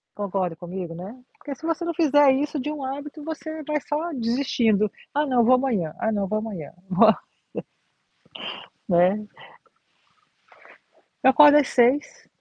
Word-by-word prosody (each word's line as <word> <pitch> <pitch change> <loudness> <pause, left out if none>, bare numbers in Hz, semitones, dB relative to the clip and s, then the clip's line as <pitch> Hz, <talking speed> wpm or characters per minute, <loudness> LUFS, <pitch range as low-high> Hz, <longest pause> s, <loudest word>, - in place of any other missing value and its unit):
Concorda 190 -4 -2
comigo, 175 0 -7
né, 190 +7 -8 0.2
porque 290 - -7
se 295 - -23
você 330 +1 -2
não 340 - -2
fizer 290 -3 +4
isso 290 +2 -2
de 295 +3 -3
um 300 -2 -6
hábito 285 +3 -6
você 315 0 -6
vai 300 0 0
só 310 +4 -2
desistindo 230 -4 +1 0.2
"Ah 295 +1 +1
não, 250 -4 +2
vou 255 +2 +6
amanhã, 225 - -1
ah 220 - 0
não 200 -2 -1
vou 215 +2 -1
amanhã, 195 -10 -7 0.2
vou" 220 +4 +6 0.4
Nossa - - -5 1.2
né? 185 +4 +2 2.0
Eu 265 - +7
acordo 295 +2 +7
às 290 - +3
6:00. 255 +4 +1
255 Hz, 150 wpm, -24 LUFS, 205-295 Hz, 2.0 s, Eu